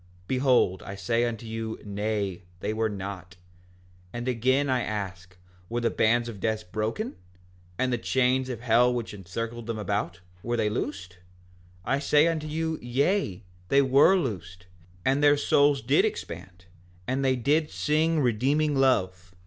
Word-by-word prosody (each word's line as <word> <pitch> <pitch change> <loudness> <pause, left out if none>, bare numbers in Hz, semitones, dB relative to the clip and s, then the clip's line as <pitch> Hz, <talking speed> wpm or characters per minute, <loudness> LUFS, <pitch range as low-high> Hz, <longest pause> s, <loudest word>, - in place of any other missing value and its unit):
Behold, 130 -8 +2
I 100 - -7
say 115 +5 0
unto 115 -1 -4
you, 110 0 -5
Nay, 100 -2 -2 0.2
they 105 +3 -2
were 110 0 0
not. 95 -3 -7
5:9 - - -28 0.8
And 120 +1 -4
again 130 +4 +2
I 130 -2 +1
ask, 95 -4 -5 0.3
were 120 - -1
the 120 - +1
bands 120 +2 +2
of 110 -4 -7
death 110 -2 -2
broken, 110 - -3 0.6
and 130 -1 0
the 120 - 0
chains 130 +1 +1
of 120 -3 -5
hell 120 +1 +4
which 120 -3 -3
encircled 115 +5 -6
them 115 -1 -3
about, 100 -4 -2 0.2
were 120 +3 -2
they 105 -2 +1
loosed? 95 -4 -4 0.7
I 135 - +1
say 150 +1 +4
unto 160 -2 -1
you, 160 +1 -2
Yea, 125 - 0 0.3
they 140 0 +5
were 140 +8 +5
loosed, 90 - -4 0.4
and 135 +2 +2
their 145 0 +5
souls 145 -1 +3
did - - +3
expand, 90 -1 -5 0.4
and 135 +2 0
they 130 -1 +3
did 150 +6 +1
sing 155 +1 +1
redeeming 140 +5 +1
love. 95 -9 +1
120 Hz, 155 wpm, -27 LUFS, 100-135 Hz, 0.8 s, they